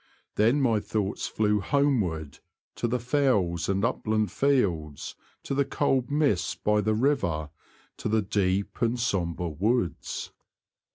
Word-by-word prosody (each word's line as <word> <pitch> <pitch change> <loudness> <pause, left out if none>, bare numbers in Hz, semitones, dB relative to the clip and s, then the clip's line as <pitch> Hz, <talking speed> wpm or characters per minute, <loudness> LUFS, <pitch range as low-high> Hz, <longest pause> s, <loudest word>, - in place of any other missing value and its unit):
Then 115 +7 +3
my 115 -5 +3
thoughts 105 -1 -2
flew 105 -1 +1
homeward 95 - 0 0.4
(to 120 - 0
the 120 +2 0
fells 120 - +1
and 100 +2 +1
upland 110 -4 0
fields, 90 - 0 0.3
to - - -3
the 140 +1 +2
cold 135 -2 0
mists 145 - +1
by 105 0 +1
the 110 +1 +1
river, 95 - 0 0.5
to - - -3
the 110 0 +2
deep 100 0 -1
and 120 +1 +1
sombre 90 -7 -1
woods). 95 - -1
110 Hz, 130 wpm, -27 LUFS, 90-125 Hz, 0.5 s, Then